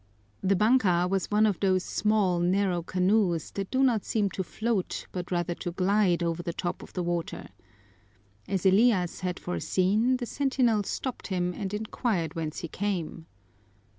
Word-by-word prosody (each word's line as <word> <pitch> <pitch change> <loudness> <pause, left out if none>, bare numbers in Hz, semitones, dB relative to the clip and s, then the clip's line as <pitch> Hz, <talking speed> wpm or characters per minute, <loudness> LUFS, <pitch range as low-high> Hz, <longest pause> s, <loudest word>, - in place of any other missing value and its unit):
The 195 +1 +2
banka 195 -5 +3
was 190 0 -1
one 215 +1 +4
of 205 -4 +1
those 185 -2 +2
small, 205 -5 +1
narrow 180 0 +1
canoes 185 -1 +1
that 195 -1 -4
do 265 +1 +2
not 235 -6 +2
seem 205 -3 0
to 190 - -3
float 215 +1 -2
but 180 -1 -5
rather 175 -1 -1
to 175 - -5
glide 185 -1 +2
over 170 0 -1
the 170 - -3
top 175 +1 -3
of - - -12
the 180 - -2
water. 175 -1 -3 1.0
As 195 -1 -2
Elias 190 -2 +3
had 180 -1 -3
foreseen, 205 +7 +1
the 245 - -4
sentinel 255 -5 +1
stopped 250 +5 -4
him 180 -2 -1
and 195 0 -4
inquired 210 - -2
whence 160 -3 -4
he 170 - -4
came. 175 -3 -3
190 Hz, 165 wpm, -28 LUFS, 175-215 Hz, 1.0 s, one